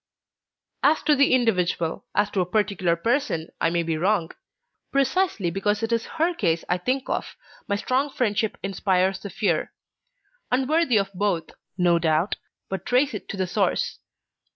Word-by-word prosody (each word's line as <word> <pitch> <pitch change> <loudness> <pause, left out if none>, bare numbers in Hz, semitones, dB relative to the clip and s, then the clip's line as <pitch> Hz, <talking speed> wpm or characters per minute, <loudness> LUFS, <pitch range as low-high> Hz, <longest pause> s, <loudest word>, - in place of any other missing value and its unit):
"As 295 +4 +3
to 300 - +4
the 280 0 +4
individual, 180 -8 0
as 205 0 +2
to 190 - +1
a - - +1
particular 190 -3 +1
person, 225 - -1
I 165 - +3
may 170 0 0
be 160 -1 -2
wrong. 185 -2 +1 0.6
Precisely 275 - +1
because 205 +4 0
it 225 - -1
is 230 -1 0
her 330 +3 +2
case 165 - 0
I 180 - +1
think 255 +7 -1
of, - - -3 0.3
my 200 - +1
strong 255 +7 0
friendship 220 -4 0
inspires 190 -1 +1
the 200 - -7
fear: 175 -3 -1 0.8
unworthy 265 0 +2
of 195 -1 0
both, 185 -3 -1 0.3
no 175 -2 +3
doubt, 160 +3 +1 0.3
but 190 -2 -4
trace 255 +4 +2
it 210 - -7
to - - -4
the 190 - 0
source. 180 - 0
200 Hz, 160 wpm, -24 LUFS, 180-250 Hz, 0.8 s, to